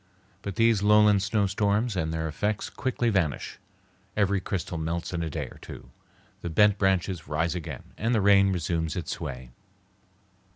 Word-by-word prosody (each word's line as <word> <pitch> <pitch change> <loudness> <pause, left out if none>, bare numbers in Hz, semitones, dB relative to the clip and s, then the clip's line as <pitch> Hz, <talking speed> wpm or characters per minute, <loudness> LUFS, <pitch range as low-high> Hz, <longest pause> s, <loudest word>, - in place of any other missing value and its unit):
But 100 -2 -5
these 115 -3 +3
lowland 105 -1 +5
snowstorms 105 +2 +1
and 80 -3 -1
their 80 0 -2
effects 105 +7 -2
quickly 120 -2 -1
vanish; 85 -9 -1 0.6
every 100 -1 +2
crystal 90 -3 -3
melts 85 +3 -3
in 85 - -2
a 80 - -2
day - - -3
or - - -13
two, - - -11 0.5
the 85 - -4
bent 105 +4 +4
branches 95 -4 0
rise 80 +3 0
again, 90 -3 -6 0.2
and 115 +2 +1
the - - +3
rain 100 -1 +5
resumes 85 -3 -1
its 90 - -4
sway. 65 -6 -6
95 Hz, 160 wpm, -27 LUFS, 80-105 Hz, 0.6 s, lowland